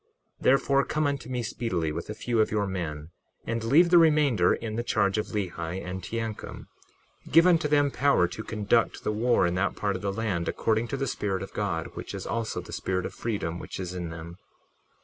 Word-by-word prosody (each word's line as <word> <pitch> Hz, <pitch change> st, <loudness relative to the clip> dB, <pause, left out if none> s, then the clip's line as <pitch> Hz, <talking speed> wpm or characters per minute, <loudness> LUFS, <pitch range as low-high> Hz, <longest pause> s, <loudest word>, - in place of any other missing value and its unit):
61:15 -, -, -14 dB
Therefore, 135 Hz, +1 st, +4 dB
come 155 Hz, 0 st, 0 dB
unto 140 Hz, -3 st, -2 dB
me 125 Hz, -2 st, -2 dB
speedily 95 Hz, -9 st, -2 dB
with 85 Hz, +5 st, -5 dB
a 105 Hz, -, -4 dB
few 115 Hz, +1 st, -1 dB
of 110 Hz, -, +2 dB
your 105 Hz, -1 st, 0 dB
men, 80 Hz, -5 st, -4 dB, 0.3 s
and 115 Hz, 0 st, -2 dB
leave 160 Hz, +9 st, +5 dB
the 175 Hz, -, +8 dB
remainder 150 Hz, -, +4 dB
in 110 Hz, -2 st, -5 dB
the 120 Hz, -, 0 dB
charge 105 Hz, -3 st, +1 dB
of 105 Hz, -, -2 dB
Lehi 90 Hz, -4 st, -3 dB
and 90 Hz, +1 st, -5 dB
Teancum; 115 Hz, 0 st, -5 dB, 0.7 s
give 165 Hz, +2 st, +7 dB
unto 170 Hz, -4 st, +4 dB
them 145 Hz, -1 st, +3 dB
power 135 Hz, -12 st, +3 dB
to 90 Hz, +5 st, -7 dB
conduct 110 Hz, +1 st, 0 dB
the -, -, 0 dB
war 115 Hz, -1 st, +2 dB
in 85 Hz, -, +1 dB
that 90 Hz, +2 st, 0 dB
part 100 Hz, -1 st, -1 dB
of 95 Hz, -, -5 dB
the 100 Hz, -1 st, -1 dB
land, 100 Hz, -5 st, -2 dB
according 110 Hz, +1 st, 0 dB
to 135 Hz, -, -3 dB
the 135 Hz, -, -1 dB
Spirit 95 Hz, -6 st, -2 dB
of -, -, -9 dB
God, 90 Hz, -6 st, -2 dB
which -, -, -6 dB
is -, -, -6 dB
also 115 Hz, +1 st, -2 dB
the -, -, -11 dB
Spirit 90 Hz, -1 st, -2 dB
of -, -, -5 dB
freedom 95 Hz, -7 st, -3 dB
which -, -, -7 dB
is 90 Hz, -1 st, -4 dB
in 90 Hz, -2 st, -4 dB
them. 80 Hz, +1 st, -8 dB
105 Hz, 215 wpm, -27 LUFS, 90-120 Hz, 0.7 s, the